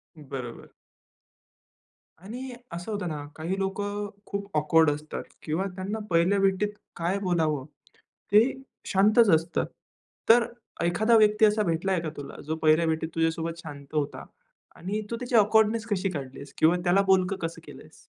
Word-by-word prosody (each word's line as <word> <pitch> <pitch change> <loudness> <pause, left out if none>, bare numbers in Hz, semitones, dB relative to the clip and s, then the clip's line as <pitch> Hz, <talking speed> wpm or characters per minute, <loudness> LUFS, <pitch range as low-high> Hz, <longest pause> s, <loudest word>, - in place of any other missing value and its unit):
बरोबर. 135 -5 -8 1.5
आणि 250 +7 -7 0.2
असं 175 +5 -6
होतं 205 -3 -3
ना, 150 -3 -4
काही 170 +5 -3
लोकं 205 +1 -2 0.2
खूप 200 0 -5
ऑकवर्ड 160 +1 +4
असतात 150 +1 -5 0.2
किंवा 160 +5 -1
त्यांना 200 +4 -4
पहिल्या 175 +4 +3
भेटीत 195 +1 +2 0.3
काय 175 +4 -1
बोलावं 160 -7 0 0.7
ते 210 +2 +7 0.4
शांतच 210 +3 +4
असतात. 165 +2 -1 0.6
तर 235 +1 +7 0.4
एखादा 215 +7 +3
व्यक्ती 215 0 +5
असा 210 0 +3
भेटलाय 175 +1 0
का 160 - -3
तुला, 140 -1 -8
जो 160 - -2
पहिल्या 155 +2 +5
भेटीत 160 0 -1
तुझ्यासोबत 165 0 -1
शांत 140 -2 -9
होता 145 -2 -2 0.5
आणि 200 +4 -3
तू - - 0
त्याची 245 +1 -3
ऑकवर्डनेस 220 +1 +4
कशी 195 -3 0
काढलीस? 140 -2 -7
किंवा 160 +3 +4
त्याला 180 +2 +4
बोलकं 190 0 +3
कसं 165 0 -4
केलं - - -11
आहेस? - - -19
180 Hz, 145 wpm, -27 LUFS, 160-205 Hz, 1.5 s, ते